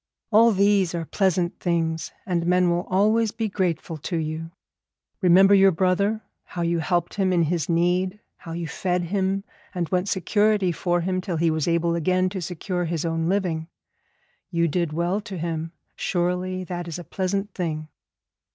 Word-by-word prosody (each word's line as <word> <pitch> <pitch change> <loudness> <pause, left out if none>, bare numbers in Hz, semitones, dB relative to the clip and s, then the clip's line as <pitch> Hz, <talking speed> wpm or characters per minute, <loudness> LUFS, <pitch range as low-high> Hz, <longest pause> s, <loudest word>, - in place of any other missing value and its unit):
All 230 +2 +6
these 195 -3 +3
are 165 -1 -3
pleasant 180 -1 0
things, 165 -2 -1
and 175 -4 -1
men 180 0 +3
will 175 +1 -1
always 215 +4 +3
be 225 0 -2
grateful 175 -5 -2
to 170 +4 -3
you. 160 +1 -3 0.7
Remember 190 +2 +6
your 195 -1 +7
brother, 190 +5 +1 0.2
how 175 - -5
you 170 0 +1
helped 175 +1 0
him 190 -2 +1
in 175 -2 +3
his 165 0 -1
need, 180 +3 +1 0.2
how 165 - -8
you 170 0 -3
fed 180 +2 -1
him 195 +2 -1 0.3
and 175 -2 -1
went 185 +1 0
security 205 0 +2
for 175 +1 0
him 185 +1 -1
till 180 -3 -3
he 165 0 +2
was 155 0 -1
able 170 0 +2
again 185 +2 +1
to 190 0 -5
secure 180 +1 -3
his 165 -1 -2
own 165 0 0
living. 175 -5 -1 0.8
You 170 -2 +1
did 170 0 -1
well 175 +6 0
to 200 -3 -7
him, 165 -1 -3 0.2
surely 180 +1 -1
that 175 -1 -5
is 165 - -5
a 175 - -7
pleasant 195 +3 -2
thing.' 155 -4 -3
180 Hz, 170 wpm, -24 LUFS, 170-190 Hz, 0.8 s, your